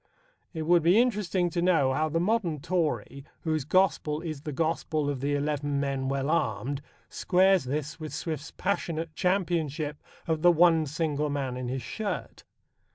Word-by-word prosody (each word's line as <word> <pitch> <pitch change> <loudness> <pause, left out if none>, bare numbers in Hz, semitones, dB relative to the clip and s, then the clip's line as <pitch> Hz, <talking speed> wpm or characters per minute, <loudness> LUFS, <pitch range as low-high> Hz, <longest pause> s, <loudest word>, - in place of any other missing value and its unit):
It 160 -3 -4
would 170 +2 +4
be 175 +7 +5
interesting 200 -7 +1
to 170 - -1
know 165 -7 +3
how 155 +3 0
the 165 +2 0
modern 180 -5 0
Tory, 155 -4 -2 0.2
whose 155 -4 -1
gospel 155 -3 +2
is 155 -4 -5
the 150 - -5
gospel 155 -1 -1
of 140 - -4
the 145 +2 0
eleven 145 -1 -1
men 135 -1 -1
well 135 +2 -1
armed, 140 -2 -1 0.3
squares 190 -2 +3
this 150 +4 -3
with 155 -1 -6
Swift's 155 -2 -4
passionate 165 -4 -2
championship 165 -5 -1 0.2
of 160 -2 -1
the 175 +1 +7
"one 165 -2 +4
single 150 0 -1
man 135 -3 -2
in 125 -1 -4
his 130 0 -3
shirt." 215 - -5
155 Hz, 160 wpm, -28 LUFS, 145-175 Hz, 0.3 s, the